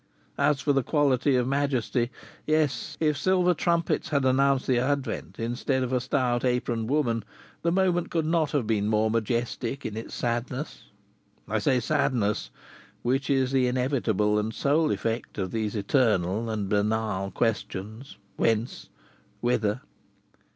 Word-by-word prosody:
As 140 -1 +2
for 145 - +2
the 135 - +3
quality 140 -1 +2
of 125 -1 +1
majesty 130 -3 0 0.4
yes, 155 -1 0
if 150 -2 +2
silver 180 +4 +3
trumpets 170 -1 0
had 140 -3 +1
announced 135 +1 +3
the 125 -2 +2
advent, 135 -2 -2
instead 120 +3 -1
of 130 0 -3
a 125 - +2
stout, 125 -2 0
aproned 120 -2 0
woman, 120 -7 +1 0.4
the 170 - +1
moment 175 -1 +1
could 165 -2 0
not 160 -2 +1
have 140 -5 0
been 105 -2 0
more 110 0 +2
majestic 115 +3 -2
in 110 - -4
its 110 - -6
sadness. 125 +4 -3 0.6
I 110 - 0
say 125 +4 +2
"sadness," 105 - 0 0.5
which 135 +3 0
is 135 -2 +2
the 130 -2 +3
inevitable 120 -5 +1
and 110 +1 -3
sole 150 +3 +2
effect 115 -3 -2
of 95 -3 -2
these 110 -1 -2
eternal 105 -2 +1
and 105 -3 -2
banal 105 -1 0
questions, 110 +3 -3 0.2
"Whence? 115 +1 0 0.5
Whither?" 120 -1 0
125 Hz, 145 wpm, -27 LUFS, 110-140 Hz, 0.6 s, the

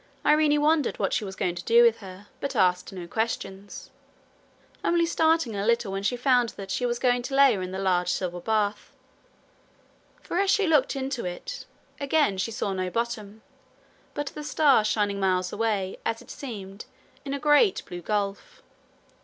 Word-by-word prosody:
Irene 300 -1 +4
wondered 300 -2 +2
what - - -1
she - - 0
was 190 -2 -6
going 180 - -1
to 175 0 -7
do 235 +1 +5
with 230 -1 +4
her, 190 -1 -11
but 280 -1 -4
asked 180 -3 +2
no 185 -3 -7
questions 200 -1 -4 0.9
only 340 -1 +2
starting 320 -7 +1
a 200 - -2
little 235 -2 +1
when 195 0 -3
she 200 +5 -1
found 245 -2 +3
that 195 -1 -7
she 245 +5 0
was 240 0 -1
going 245 0 +2
to 270 +3 -4
lay 275 -2 +6
her 195 - -3
in 185 - -4
the 190 - -5
large 180 -2 +1
silver 180 -1 -3
bath; 210 +1 -1 1.3
for 350 - -2
as 395 0 +2
she 405 0 +3
looked 305 -6 +2
into 265 -2 -3
it, 335 - -6 0.3
again 280 -8 +1
she 190 - -1
saw 205 -3 -3
no 185 -1 -2
bottom, 220 -1 -4 0.7
but 290 - -2
the 300 - -7
stars 290 -7 +3
shining 205 -2 0
miles 185 -1 0
away, 205 -4 -1
as 225 0 -2
it - - -13
seemed, 200 -6 -8 0.4
in 280 -1 -3
a - - -4
great 300 - +3
blue 175 0 -8
gulf. 200 +1 -3
225 Hz, 180 wpm, -26 LUFS, 195-275 Hz, 1.3 s, lay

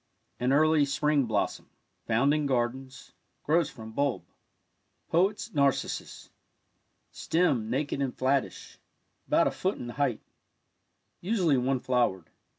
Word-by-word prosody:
An 125 +1 +1
early 155 +1 +4
spring 145 0 +1
blossom— - - -2 0.4
found 120 +6 +3
in 150 -1 0
gardens 130 +1 -3 0.2
— - - -47
grows 160 0 +2
from 110 -1 -10
bulb. 140 +3 -1 0.9
Poet's 195 +6 +1
Narcissus. 140 -2 -1 0.4
— - - -47
Stem 140 -10 +1
naked 140 +3 -2
and 135 -2 -2
flattish 135 +1 -1 0.2
— - - -47
about - - +3
a - - +1
foot 190 +2 -2
in 120 - -7
height 130 -3 -1 0.5
— - - -49
usually 180 -6 +2
one 130 0 0
flowered. 110 -9 0
140 Hz, 135 wpm, -28 LUFS, 125-150 Hz, 0.9 s, early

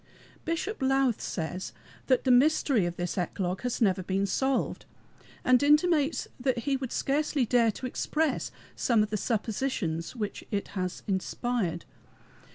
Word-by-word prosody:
Bishop 335 +4 -2
Lowth 270 -3 +2
says 180 +2 -4 0.3
that 255 -2 +3
the 260 - +3
mystery 255 - +4
of 175 - -4
this 175 +1 -2
eclogue 180 +1 -2
has 250 -1 -2
never 190 -3 +2
been 190 +2 0
solved, 265 +6 -1 0.6
and 255 -1 +5
intimates 300 +1 +3
that 255 -1 0
he 280 -1 +2
would 260 -2 -4
scarcely 285 -1 +1
dare 235 -1 +3
to 260 - -7
express 305 +4 -1 0.3
some 230 -4 +3
of 210 - -4
the - - 0
suppositions 215 -6 -2
which 210 -4 -4
it 200 -2 -2
has 185 -2 -4
inspired. 190 -2 -1
245 Hz, 145 wpm, -28 LUFS, 190-270 Hz, 0.6 s, and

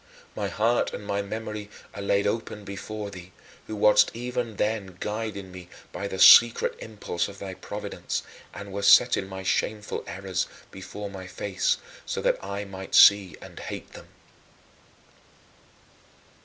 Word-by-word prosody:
My 105 - -2
heart 115 +4 +1
and 105 - -8
my 100 0 -1
memory 105 0 -6 0.2
are 100 - -7
laid 100 0 +1
open 105 -1 -2
before 100 +1 -6
thee, 90 -1 -11 0.3
who 110 - -5
wast 105 0 +5
even 120 -1 -3
then 100 -4 -2
guiding 105 -3 -4
me 90 -1 -11 0.2
by 100 - -4
the 95 - -5
secret 115 +5 +7
impulse 100 -5 -3
of 100 -1 -11
thy 95 -1 -6
providence 100 +2 -5 0.3
and 100 -1 -9
wast 100 0 +4
setting 95 - +5
my 95 0 -7
shameful 105 +2 -1
errors 95 0 -3 0.2
before 100 +1 -8
my 95 -1 -8
face 95 0 -1 0.3
so - - -4
that - - 0
I 100 +1 -4
might 95 -1 -6
see 100 -3 +7
and - - -11
hate - - -7
them. - - -12
100 Hz, 145 wpm, -26 LUFS, 95-105 Hz, 0.3 s, secret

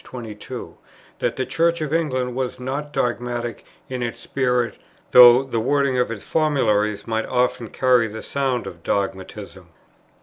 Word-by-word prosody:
22; 110 -4 -8 0.4
that - - -1
the 130 - -2
Church 170 +3 +1
of 155 -1 -3
England 130 -6 0
was 130 0 -3
not 140 +4 -4
dogmatic 120 -2 -2 0.2
in 130 -1 -4
its 120 -1 -3
spirit, 125 -3 -1 0.3
though 125 +1 +9
the 130 -4 -2
wording 140 +2 +1
of 125 - +1
its 110 -3 -6
formularies 110 -10 +1
might 110 -1 -2
often 125 -2 0
carry 125 -3 +3
the 110 +1 -8
sound 135 -3 -1
of 85 - -9
dogmatism, 95 0 -4
p. - - -27
125 Hz, 155 wpm, -22 LUFS, 110-130 Hz, 0.4 s, though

